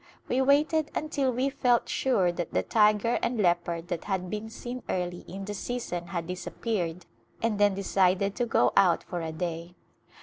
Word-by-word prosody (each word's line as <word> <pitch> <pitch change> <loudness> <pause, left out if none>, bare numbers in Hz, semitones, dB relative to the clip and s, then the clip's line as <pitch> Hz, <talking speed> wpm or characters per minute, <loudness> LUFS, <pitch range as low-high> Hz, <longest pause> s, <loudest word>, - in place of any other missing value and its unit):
We 255 - +1
waited 295 +3 +3
until 285 -4 0
we 255 +3 0
felt 245 -3 +2
sure 195 -10 +2
that 175 0 -5
the - - +2
tiger 215 +1 +3
and 245 - -1
leopard 175 -2 +1
that 175 -3 -3
had 185 -3 -2
been 215 +1 -4
seen 245 +3 -6
early 180 -1 -2
in 195 +1 -6
the 205 - -4
season 205 -6 -4
had 170 -1 -3
disappeared 180 -1 -3 0.3
and 225 -2 0
then 205 -1 +4
decided 195 0 +2
to 245 - 0
go 120 - +3
out 180 -4 +4
for 175 -2 -5
a 160 -1 -3
day. 170 +1 -4
195 Hz, 175 wpm, -28 LUFS, 175-240 Hz, 0.3 s, then